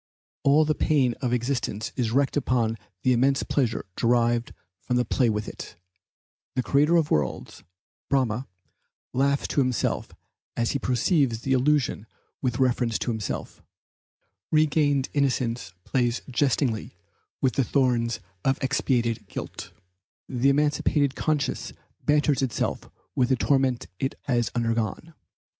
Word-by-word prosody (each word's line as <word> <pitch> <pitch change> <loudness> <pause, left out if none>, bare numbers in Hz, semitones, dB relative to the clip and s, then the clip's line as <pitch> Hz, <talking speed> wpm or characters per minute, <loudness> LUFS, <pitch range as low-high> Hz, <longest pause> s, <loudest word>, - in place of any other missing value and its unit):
All 145 +3 +5
the 155 - +2
pain 135 -6 +2
of 125 -3 0
existence 120 -3 -1
is 120 -4 0
wrecked 135 +4 +1
upon 120 -5 +1 0.3
the 130 - +4
immense 135 +3 +2
pleasure 125 -6 0
derived 120 0 +2 0.3
from 125 - -2
the 125 0 +2
play 125 -4 +2
with 105 -1 -2
it; - - -8 0.8
the 130 - +1
creator 150 +6 +3
of 160 -3 +2
worlds, 70 -4 -1 0.5
Brahma, 130 -2 +1 0.7
laughs 140 +2 +1
to 140 - +2
himself 125 -2 0 0.5
as 115 0 +1
he 140 - -1
perceives 125 - +1
the 135 +2 0
illusion 130 -4 +1 0.3
with 125 -3 -1
reference 125 -3 +1
to 120 - -2
himself; 110 -3 -4 0.9
regained 145 -3 +2
innocence 125 -6 0
plays 120 +1 0
jestingly 125 -3 0 0.4
with 130 -3 +1
the 135 - +2
thorns 120 -2 +1 0.2
of 135 0 +2
expiated 120 -5 0
guilt; - - -7 0.6
the 130 +1 +2
emancipated 145 0 +2
conscience 150 -3 -1 0.3
banters 150 -1 +3
itself 130 -4 -2 0.3
with 125 -1 +2
the 130 - +4
torments 130 -1 +1
it 135 - -1
has 120 -6 +1
undergone. 115 - -1
130 Hz, 130 wpm, -26 LUFS, 120-140 Hz, 0.9 s, All